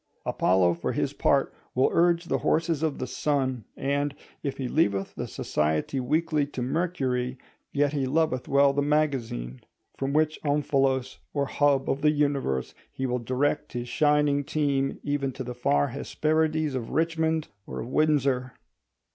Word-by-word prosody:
Apollo 90 Hz, -2 st, +3 dB
for 85 Hz, -, -3 dB
his -, -, -1 dB
part -, -, +2 dB, 0.2 s
will 130 Hz, -, +3 dB
urge 170 Hz, 0 st, +3 dB
the -, -, 0 dB
horses 165 Hz, -1 st, +1 dB
of 160 Hz, -3 st, 0 dB
the -, -, -3 dB
Sun: 130 Hz, -4 st, -1 dB
and, 140 Hz, +1 st, -1 dB, 0.3 s
if 140 Hz, -2 st, -3 dB
he 130 Hz, -, -2 dB
leaveth 100 Hz, -10 st, +1 dB
the -, -, -5 dB
society 75 Hz, -, -1 dB
weekly 155 Hz, +3 st, +1 dB
to 130 Hz, -3 st, -4 dB
Mercury, 130 Hz, -4 st, -1 dB, 0.3 s
yet 145 Hz, 0 st, +1 dB
he 135 Hz, -3 st, 0 dB
loveth 145 Hz, -3 st, 0 dB
well 140 Hz, 0 st, +4 dB
the 145 Hz, -, +1 dB
Magazine. 130 Hz, -, -1 dB, 0.3 s
From 135 Hz, 0 st, -2 dB
which 155 Hz, +1 st, +1 dB
omphalos 135 Hz, -3 st, +1 dB, 0.2 s
or 140 Hz, -1 st, +1 dB
hub 140 Hz, -1 st, +2 dB
of 135 Hz, -, 0 dB
the 150 Hz, -, +5 dB
universe 140 Hz, -, 0 dB, 0.2 s
he 130 Hz, -, -3 dB
will 125 Hz, -1 st, 0 dB
direct 135 Hz, +5 st, -1 dB
his 120 Hz, 0 st, -4 dB
shining 150 Hz, -1 st, +3 dB
team 140 Hz, -2 st, 0 dB
even 145 Hz, -2 st, -1 dB
to 130 Hz, -, -5 dB
the 125 Hz, 0 st, -5 dB
far 70 Hz, -12 st, +1 dB
Hesperides 155 Hz, -1 st, 0 dB
of 125 Hz, -3 st, -3 dB
Richmond 160 Hz, -1 st, 0 dB, 0.2 s
or -, -, -5 dB
of -, -, -6 dB
Windsor. 135 Hz, -3 st, +1 dB
140 Hz, 155 wpm, -27 LUFS, 125-150 Hz, 0.3 s, the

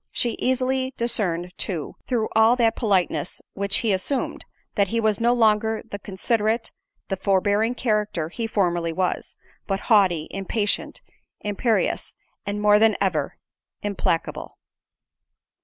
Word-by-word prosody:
She 240 Hz, -, 0 dB
easily 260 Hz, +1 st, 0 dB
discerned, 180 Hz, -7 st, 0 dB
too, 170 Hz, -7 st, -3 dB
through 230 Hz, -3 st, 0 dB
all 220 Hz, +2 st, +6 dB
that 230 Hz, -2 st, +2 dB
politeness 195 Hz, -6 st, 0 dB
which 200 Hz, 0 st, 0 dB
he 220 Hz, -4 st, +2 dB
assumed—that 200 Hz, -1 st, -2 dB
he 230 Hz, +5 st, -1 dB
was 215 Hz, -2 st, +1 dB
no 235 Hz, +1 st, +4 dB
longer 220 Hz, -2 st, +2 dB
the 205 Hz, -, -4 dB
considerate, 220 Hz, +4 st, -1 dB, 0.4 s
the 195 Hz, -, 0 dB
forbearing 205 Hz, +4 st, +1 dB
character 210 Hz, -9 st, 0 dB
he 230 Hz, +6 st, -3 dB
formerly 175 Hz, -6 st, 0 dB
was; 185 Hz, +1 st, -2 dB, 0.3 s
but 195 Hz, -1 st, 0 dB
haughty, 185 Hz, -7 st, +4 dB
impatient, 205 Hz, +2 st, -2 dB, 0.4 s
imperious, 210 Hz, +2 st, 0 dB, 0.3 s
and 205 Hz, +1 st, -2 dB
more 210 Hz, 0 st, +5 dB
than 220 Hz, -1 st, +4 dB
ever, 165 Hz, -7 st, -1 dB, 0.5 s
implacable. 200 Hz, -5 st, -2 dB
210 Hz, 125 wpm, -24 LUFS, 190-230 Hz, 0.5 s, all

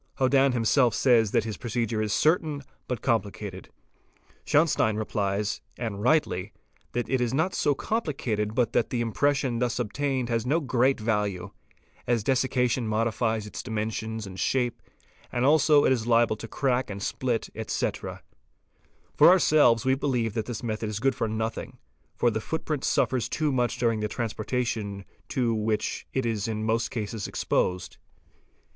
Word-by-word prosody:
Hodann 135 Hz, 0 st, +3 dB
himself 120 Hz, +1 st, +3 dB
says 115 Hz, -5 st, +4 dB
that 110 Hz, -, +2 dB
his 110 Hz, -2 st, -5 dB
procedure 115 Hz, -2 st, -2 dB
is 105 Hz, -1 st, -1 dB
certain 155 Hz, -, +1 dB, 0.2 s
but 125 Hz, -4 st, -4 dB
complicated. 100 Hz, -5 st, -2 dB, 0.7 s
Schauenstein 145 Hz, -8 st, +2 dB
replies, 105 Hz, -1 st, -1 dB, 0.2 s
and 110 Hz, -4 st, -4 dB
rightly, 110 Hz, -, +1 dB, 0.4 s
that 120 Hz, 0 st, -1 dB
it 130 Hz, -1 st, 0 dB
is 120 Hz, +1 st, 0 dB
not 160 Hz, +6 st, +1 dB
so 145 Hz, -, +1 dB
complicated 125 Hz, -, -2 dB
but 120 Hz, -1 st, +1 dB
that 115 Hz, -, +2 dB
the 125 Hz, -, -2 dB
impression 125 Hz, +1 st, 0 dB
thus 120 Hz, -1 st, 0 dB
obtained 130 Hz, +2 st, -1 dB
has 115 Hz, -2 st, 0 dB
no 145 Hz, +7 st, +1 dB
great 130 Hz, -3 st, +1 dB
value, 105 Hz, -4 st, -1 dB, 0.6 s
as 120 Hz, -3 st, +1 dB
dessication 125 Hz, -2 st, +1 dB
modifies 110 Hz, 0 st, 0 dB
its 105 Hz, -, -6 dB
dimensions 110 Hz, -1 st, -3 dB
and 95 Hz, -1 st, -9 dB
shape, 125 Hz, -3 st, 0 dB, 0.5 s
and 120 Hz, +1 st, 0 dB
as -, -, +5 dB
also 150 Hz, -1 st, +5 dB
it -, -, +4 dB
is 120 Hz, -3 st, 0 dB
lable 115 Hz, -2 st, +4 dB
to 115 Hz, -, -7 dB
crack 130 Hz, +1 st, 0 dB
and 100 Hz, -1 st, -5 dB
split, 120 Hz, -1 st, -2 dB
etc.; -, -, -3 dB, 0.9 s
for -, -, +8 dB
ourselves 150 Hz, -, +5 dB
we 130 Hz, -, +4 dB
believe 125 Hz, -5 st, 0 dB
that 110 Hz, -1 st, -3 dB
this 120 Hz, -1 st, -5 dB
method 110 Hz, -1 st, -2 dB
is 105 Hz, -1 st, -3 dB
good 135 Hz, +3 st, +2 dB
for 115 Hz, -, -2 dB
nothing, 110 Hz, +1 st, -4 dB, 0.4 s
for 120 Hz, -, +2 dB
the 110 Hz, 0 st, -2 dB
footprint 155 Hz, +1 st, -3 dB
suffers 130 Hz, -3 st, +1 dB
too 155 Hz, -2 st, 0 dB
much 125 Hz, -2 st, 0 dB
during 115 Hz, -2 st, +1 dB
the 105 Hz, -, -1 dB
transportation 110 Hz, -2 st, -3 dB, 0.2 s
to 120 Hz, -3 st, +1 dB
which 110 Hz, 0 st, -2 dB
it 130 Hz, -2 st, -1 dB
is 110 Hz, -3 st, -1 dB
in 110 Hz, -1 st, -3 dB
most 115 Hz, +1 st, 0 dB
cases 110 Hz, -3 st, -4 dB
exposed. 90 Hz, -1 st, -1 dB
115 Hz, 160 wpm, -27 LUFS, 110-130 Hz, 0.9 s, for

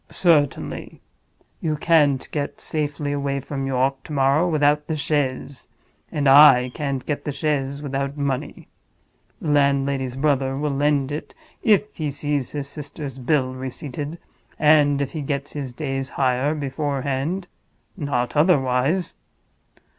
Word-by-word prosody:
"Certainly. 155 Hz, -6 st, +1 dB, 0.6 s
You 155 Hz, -1 st, -1 dB
can't 145 Hz, -4 st, +3 dB
get 145 Hz, -2 st, -3 dB
safely 145 Hz, -1 st, -2 dB
away 140 Hz, -1 st, -1 dB
from 135 Hz, 0 st, -4 dB
York 135 Hz, +1 st, 0 dB
to -, -, -10 dB
morrow 140 Hz, +5 st, +3 dB
without 150 Hz, -1 st, +2 dB
the 160 Hz, -, -1 dB
chaise. 140 Hz, -3 st, -2 dB, 0.4 s
And 145 Hz, -2 st, 0 dB
I 135 Hz, -3 st, +8 dB
can't 140 Hz, -4 st, -3 dB
get 150 Hz, -, -3 dB
the 150 Hz, -, -3 dB
chaise 140 Hz, -1 st, -2 dB
without 140 Hz, 0 st, -3 dB
money. 140 Hz, 0 st, -3 dB, 0.7 s
The 155 Hz, -, -4 dB
landlady's 140 Hz, -2 st, +1 dB
brother 135 Hz, -1 st, +1 dB
will 150 Hz, +1 st, -1 dB
lend 140 Hz, -1 st, +1 dB
it 150 Hz, -, -6 dB, 0.3 s
if 210 Hz, -1 st, +2 dB
he 155 Hz, -2 st, -1 dB
sees 145 Hz, -2 st, -2 dB
his 145 Hz, -2 st, -5 dB
sister's 140 Hz, -2 st, -7 dB
bill 130 Hz, 0 st, +1 dB
receipted, 135 Hz, +4 st, -6 dB, 0.4 s
and 145 Hz, -2 st, +4 dB
if 135 Hz, -, -5 dB
he 155 Hz, -, -4 dB
gets 140 Hz, 0 st, -3 dB
his 140 Hz, -4 st, -4 dB
day's 135 Hz, 0 st, -3 dB
hire 135 Hz, +3 st, +1 dB
beforehand—not 145 Hz, 0 st, -3 dB
otherwise. 150 Hz, +1 st, +2 dB
140 Hz, 130 wpm, -23 LUFS, 135-150 Hz, 0.7 s, I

